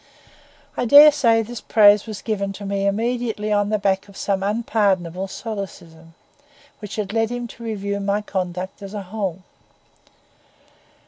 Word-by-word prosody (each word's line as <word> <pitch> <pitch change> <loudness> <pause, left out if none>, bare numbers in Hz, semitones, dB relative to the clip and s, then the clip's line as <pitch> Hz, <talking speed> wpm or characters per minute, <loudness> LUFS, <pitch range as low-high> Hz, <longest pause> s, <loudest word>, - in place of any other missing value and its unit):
I - - -1
dare 290 +5 +9
say 230 -6 +2
this 235 +1 -8
praise 205 -1 +5
was 215 -2 -7
given 200 -3 -2
me 200 0 -1
immediately 225 0 -1
on 205 0 +1
the 215 - +1
back 195 -1 0
of 200 - -14
some 195 -1 -1
unpardonable 195 -4 0
solecism, 175 -6 -8 0.6
which 210 -3 -7
had 205 -2 -4
led 225 -1 +1
him 245 0 -4
to 235 - -12
review 200 -3 -3
my 200 +1 -1
conduct 185 -1 -4
as 200 +1 -8
a 205 - -4
whole. 190 -2 -4
205 Hz, 145 wpm, -21 LUFS, 195-225 Hz, 0.6 s, dare